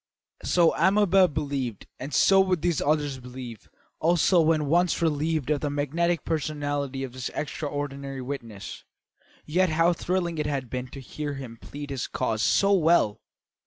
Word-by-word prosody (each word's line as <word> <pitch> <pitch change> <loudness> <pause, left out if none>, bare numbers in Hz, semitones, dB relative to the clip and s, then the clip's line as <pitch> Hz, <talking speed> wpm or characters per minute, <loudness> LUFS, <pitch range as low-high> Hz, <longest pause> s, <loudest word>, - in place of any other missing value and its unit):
So 170 -2 +3
Amabel 190 +2 +4
believed 140 - -3
and 135 +3 -6
so 195 +8 +5
would 185 -4 0
these 175 -4 +1
others 145 -2 0
believe 125 -3 -9 0.3
also 170 +2 +4
when 155 -1 +2
once 175 +4 +2
relieved 155 -2 0
of 150 - +1
the 145 - -1
magnetic 155 +4 -1
personality 145 -3 -2
of 130 -2 -6
this 130 0 -4
extraordinary 140 -3 -4
witness. 115 -7 -7 0.6
Yet 180 +4 +2
how 165 +2 +3
thrilling 175 -1 -2
it 150 - -1
had 135 -5 -3
been 125 0 -3
to 135 - -10
hear 145 +2 -5
him 130 -4 -8
plead 145 +4 -8
his 135 -3 -3
cause 110 -1 -2
so 200 - +3
well! 165 - +3
145 Hz, 155 wpm, -26 LUFS, 135-170 Hz, 0.6 s, so